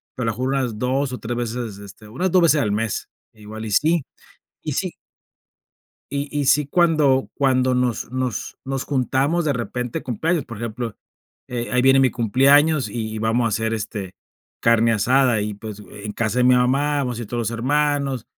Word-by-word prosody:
pero 125 -3 -1
a - - -1
lo 110 - -13
mejor 130 +1 -1
unas 125 -5 -1
2, 130 +2 0
o, - - -3
3 120 +1 -4
veces, 120 -3 -4
este, 100 +2 -12
unas 160 +12 -1
2 185 - +5
veces 155 -3 +4
al 105 - 0
mes, 110 0 -2 0.3
igual 110 +1 -9
y 110 - -5
sí. 155 - +2 0.6
Y - - -3
sí. - - -2 1.2
Y 140 +1 -2
y 145 -1 -1
sí 145 +2 +4
cuando 150 -4 +3
cuando 130 -2 +2
nos 125 -2 -1
nos 130 -4 -3
nos 135 0 -2
juntamos 140 +5 0
de 145 - +2
repente 125 -1 -3
de - - -15
cumpleaños, 155 +5 -1
por 115 -3 -9
ejemplo, 115 0 -4 0.5
eh, 120 -1 -4
ahí 125 0 +3
viene 135 0 +6
mi 130 - +4
cumpleaños, 135 +6 +3
y 110 -2 -4
y 110 - -4
vamos 115 +2 +1
a - - +2
hacer, 110 +1 -1
este, 100 -3 -5 0.4
carne 115 0 +4
asada 125 +2 +3
y, 105 0 -3
pues, 105 0 -8
en 105 0 -7
casa 115 +2 -1
de 125 - +4
mi 125 0 +6
mamá, 140 +4 +2
vamos 125 -4 -2
a - - -4
ir 115 - -7
todos 120 - -3
los - - -7
hermanos, 140 +1 0
125 Hz, 200 wpm, -22 LUFS, 115-140 Hz, 1.2 s, viene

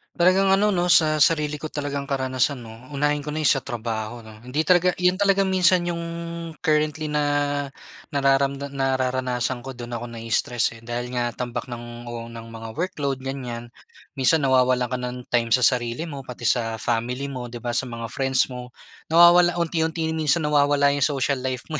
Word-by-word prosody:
Talagang 185 +2 +4
ano 200 +1 +3
'no, 175 0 +2
sa 155 -2 +5
sarili 150 -2 +2
ko 155 +1 -7
talagang 145 -1 -3
karanasan 130 0 0
'no, 115 +3 -12
unahin 145 +1 0
ko 150 - -5
na 155 - -3
yung 155 - +2
sa 135 -1 +3
trabaho 115 0 -4
'no. 110 0 -14
Hindi 145 +6 -2
talaga 180 0 +5
yun 180 0 +3
talaga 195 0 +2
minsan 185 -1 +3
yung 170 -1 -2 0.6
currently 155 -1 0
na 150 0 0 0.9
nararamda 140 0 +1
nararanasan 130 -2 -1
ko, 135 - -6
do'n 120 -1 -7
ako 120 0 -6
na-i-stress 115 +1 -1
eh. 115 - -14
Dahil 120 +1 -4
nga 120 -1 0
tambak 120 0 -4
ng 120 0 -8
o 115 -1 -6
ng 115 -1 -9
mga 115 0 -9
workload 140 -6 -2
ganyan, 120 -3 -5 0.5
minsan 145 +4 +3
nawawalan 130 -2 +3
ka 125 - 0
ng 125 0 -4
time 120 -1 +2
sa 125 - 0
sarili 120 +3 +1
mo, 140 -5 -7
pati 125 - -9
sa 115 -2 +1
family 120 +5 -2
mo, 125 -2 -5
'di 120 -1 -9
ba, 120 - -1
sa 125 - -1
mga 115 -2 -6
friends 130 0 +1
mo. 125 0 -7 0.4
Nawawala 175 +1 +6
unti-unti 160 -1 -1
minsan 160 0 +1
nawawala 145 -1 +3
yung 140 0 +2
social 140 -2 0
life 130 -1 -3
mo, 155 - -2
135 Hz, 180 wpm, -23 LUFS, 120-155 Hz, 0.9 s, Nawawala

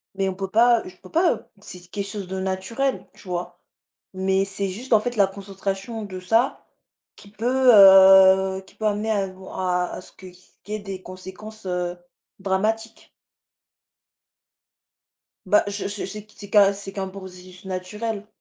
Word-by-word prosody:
Mais 195 0 0
on - - -3
peut 195 0 -5
pas, 235 +2 +4
heu - - -7
je 180 - -18
peux 185 - -16
pas, 340 +2 +3
heu - - -10 0.2
c'est 180 - -9
quelque 200 -1 -4
chose 200 -2 -5
de 190 +1 -4
naturel, 190 +8 -2
tu - - -17
vois? 175 0 -5 0.5
Mais 190 +1 +1
c'est 195 0 -3
juste 235 +7 -4
en 220 - +7
fait 245 +2 -3
la 200 -2 +5
concentration 195 +3 -5
de 190 -2 -7
ça, 225 +8 0 0.5
qui 200 - -16
peut, 250 +4 +3
heu 190 -1 +7
qui - - -20
peut 220 - -5
amener 210 +2 -1
à 200 -2 0
bon 185 0 -12
à 180 -1 0
à - - -7
ce - - -16
que 185 -1 -13
ce 180 +1 -22
qu'il 210 +2 -7
y - - -2
ait - - -9
des 195 -2 -7
conséquences, 190 +4 -11
heu, 180 -1 -2 0.4
dramatiques. 215 +4 -2 2.4
Bah, 205 +2 +4
je 200 0 -3
je 205 0 -4
c'est 210 +2 -8
c'est 205 -1 -12
qu'un, 200 -1 +5
c'est 195 0 -8
qu'un 195 -1 -4
processus 185 -1 -11
naturel, 205 +3 -5
195 Hz, 180 wpm, -23 LUFS, 190-210 Hz, 2.4 s, en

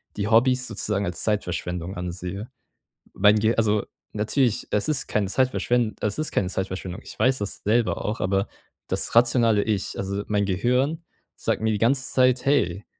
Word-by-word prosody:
die 100 0 -2
Hobbys 125 +2 +3
sozusagen 100 -1 -2
als 90 -2 -3
Zeitverschwendung 90 -3 -2
ansehe. 90 +5 -5 0.6
Mein 105 +2 +5
Ge 110 +2 +2
also 105 -2 +2 0.3
natürlich, 110 +2 0
es 105 - +1
ist 155 -3 0
keine 105 -2 0
Zeitverschwen 120 0 +1
es 105 -1 -2
ist 155 - -2
keine 95 - 0
Zeitverschwendung. 95 +1 -4
Ich - - -12
weiß 130 0 +3
das 100 -1 -5
selber 115 +2 +1
auch, 105 +2 -2
aber 95 +1 0 0.4
das - - 0
rationale 115 -2 +4
Ich, 105 -3 -2
also 100 +1 -3
mein 105 -1 +1
Gehirn, 125 - 0 0.3
sagt - - -2
mir 110 0 +1
die - - 0
ganze 130 +3 +2
Zeit: 130 -1 +3
„Hey, 105 -9 +1
105 Hz, 165 wpm, -24 LUFS, 100-125 Hz, 0.6 s, Mein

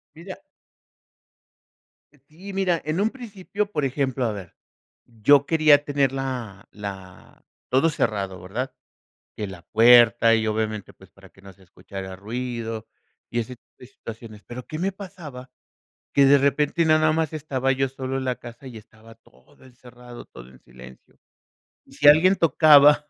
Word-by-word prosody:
Mira. 180 - -10 1.9
Sí, 185 +6 -11
mira, 185 -4 0
en 155 +5 -1
un 215 - +2
principio, 210 -4 -6
por 150 -5 -2
ejemplo, 130 -1 -1
a 115 - 0
ver, 95 -4 -9 0.5
yo 120 +5 +3
quería 155 -3 +4
tener 140 -2 0
la 125 -7 -6
la 95 -3 -10 0.3
todo 135 +6 +3
cerrado, 100 - -2
¿verdad? 120 +9 -5 0.6
Que 105 - -5
la 90 -3 -11
puerta 115 0 +5
y 110 -1 -1
obviamente, 110 -2 -3
pues - - -19
para - - -18
que 95 - -23
no 100 0 -14
se 95 - -23
escuchara 95 +1 -9
ruido 115 +1 -5 0.4
y 120 - -2
ese 125 +2 -5
tipo - - -43
de - - -12
situaciones. 115 -4 -11
Pero, 120 +1 -9
¿qué 155 - -6
me 190 +3 -1
pasaba? 175 -10 -11 0.6
Que 140 -1 +5
de 140 +1 +6
repente 140 +4 +1
nada 155 0 +3
más 160 -1 -1
estaba 135 -4 -1
yo 135 0 0
solo 130 0 -5
en 130 - -4
la 125 -1 -2
casa, 120 +3 -12
y 125 -3 -10
estaba 110 +1 -16
todo 120 +3 -25
encerrado, 125 -1 -14
todo - - -14
en 65 0 -19
silencio. 65 +1 -16 0.7
Y - - -22
si 145 - +4
alguien 170 +6 +6
tocaba, 150 -2 +5
130 Hz, 160 wpm, -23 LUFS, 110-150 Hz, 1.9 s, de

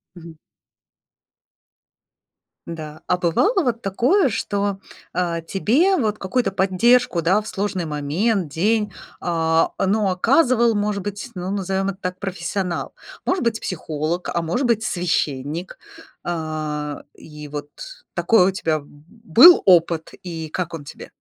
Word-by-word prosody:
Мгм. 170 -2 -11 2.3
Да, 155 -2 -8
а 180 - +2
бывало 285 - +2
вот 235 -5 -1
такое, 260 - +2
что, 200 -2 -2 0.3
а, 170 -1 -1
тебе 255 - +2
вот 215 -6 0
какую-то 195 +2 -1
поддержку, 195 +1 +3
да, 185 +6 +3
в 215 - -10
сложный 195 -3 -2
момент, 160 +6 -1
день, 210 +6 0 0.3
а, 165 -1 +1
э, - - +1
ну, 205 +1 +1
оказывал, 235 - +3
может 205 -1 -1
быть, 205 +3 -5
ну, 180 +1 -4
назовем 195 0 -1
это 195 - -5
так, 180 0 -4
профессионал? 190 -1 -3 0.3
Может 365 -3 0
быть, 230 -1 0
психолог, 160 0 -3
а 170 - 0
может 175 +12 -1
быть, 230 -2 +1
священник. 165 -3 -2 0.5
А, 155 -3 -4
и 150 -1 -11
вот 145 0 -6 0.4
такой 215 -5 +4
у - - +2
тебя 160 -4 -1
был 225 - +5
опыт, 170 -3 +3
и 165 -3 -5
как 170 +1 -4
он 150 -3 -7
тебе? - - -10
185 Hz, 135 wpm, -21 LUFS, 165-215 Hz, 2.3 s, был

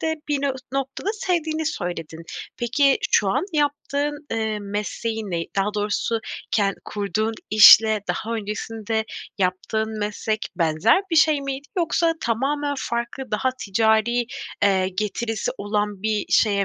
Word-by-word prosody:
de 320 0 0
bir 285 -1 0
no 280 - +2 0.2
noktada 275 +7 -3
sevdiğini 320 -6 -1
söyledin. 165 - -4 0.3
Peki, 270 +4 +3
şu 200 - +4
an 265 - +1
yaptığın, 290 0 -1
eee, 220 -1 -1
mesleğin 210 +1 -3
ne? 165 -1 -1
Daha 205 +2 +1
doğrusu 210 +2 -1 0.3
ken 200 -2 +2
kurduğun 215 +2 -1 0.2
işle 215 +1 +8
daha 230 +1 -2
öncesinde 220 +1 -3 0.3
yaptığın 215 +4 -1
meslek 210 +1 -2 0.2
benzer 170 - +3
bir 330 - +1
şey 310 -2 +5
miydi, 275 +1 -5
yoksa 335 -1 +2
tamamen 285 +5 0
farklı, 235 +2 -4
daha 220 +5 +1
ticari, 220 +3 +2 0.4
eee, 190 -2 +3
getirisi 215 +3 -2
olan 205 -1 -2
bir 215 -1 0
şeye 200 -2 +4
220 Hz, 130 wpm, -23 LUFS, 205-275 Hz, 0.4 s, işle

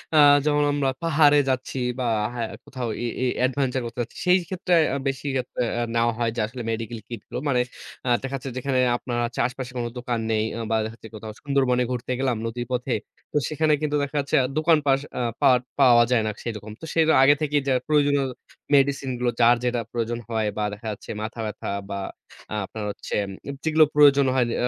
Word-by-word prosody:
আ - - +6 0.3
যখন 150 -1 +3
আমরা 140 -2 +1
পাহাড়ে 150 -2 +5
যাচ্ছি 130 +1 -2 0.2
বা, 125 - -1 0.3
হ্যাঁ, 115 -2 -2 0.2
কোথাও 125 -3 -4
এ - - -1 0.2
এ - - +2 0.2
adventure 130 -1 0
করতে 120 +1 -7
যাচ্ছি, 115 - -13
সেইক্ষেত্রে 180 0 +2 0.2
আ - - 0
বেশি 135 +1 -3
আপ 125 - -19 0.2
আ - - 0 0.3
নেওয়া 115 0 +2
হয় 115 -1 +1
যে, 120 - -3
আসলে 120 +2 -7
মেডিকেল 115 0 -4
কিটগুলো। 120 +1 -6
মানে 125 -3 +3 0.5
আস 120 -1 +4
দেখা 135 +1 -3
যাচ্ছে, 135 +1 -6
যেখানে 130 0 0 0.2
আপনার 120 -1 -4 0.3
আশপাশে 130 0 -7
কোন 120 - -1
দোকান 120 -1 -2
নেই 110 0 +2 0.3
বা, - - +3
দেখা 110 - -6
যাচ্ছে 110 -2 -12
কোথাও 110 0 -7
সুন্দরবনে 130 -3 +2
ঘুরতে 125 0 -3
গেলাম, 130 -2 +1
নদীর 120 +1 -4
পথে। 125 +1 -1 0.4
তো - - 0
সেখানে 155 0 +2
কিন্তু 150 -1 0
দেখা 140 +1 -5
যাচ্ছে 140 -1 -1
আ - - +1
দোকান 160 0 +4
পাস 135 -1 +4 0.2
আ - - 0 0.2
পাট 125 -2 +5 0.2
পাওয়া 120 -3 +7
যায় 120 -3 +4
না, - - 0
সেরকম। 110 -2 -5
তো, - - -6
সেটা 160 -1 +4
আগে 145 +2 +6
থেকেই 150 -1 +1
যা 135 - +3
প্রয়োজনীয় 145 -2 +3 0.5
মেডিসিনগুলো 135 -3 +1
যার 120 +1 +6
যেটা 125 -1 0
প্রয়োজন 120 0 -2
হয় 110 -2 0
বা, 105 - 0
দেখা 110 +2 -8
যাচ্ছে 105 - -10
মাথাব্যাথা 110 -1 -5 0.2
বা, 100 - -3 0.5
আ - - -2
আপনার 110 +1 -7
হচ্ছে - - -9 0.3
উম 140 - -4
যেগুলো 160 0 +5
প্রয়োজন 140 -1 +6
হয় 125 -2 +3
যে - - -2
আ - - +2
125 Hz, 200 wpm, -24 LUFS, 120-140 Hz, 0.5 s, পাওয়া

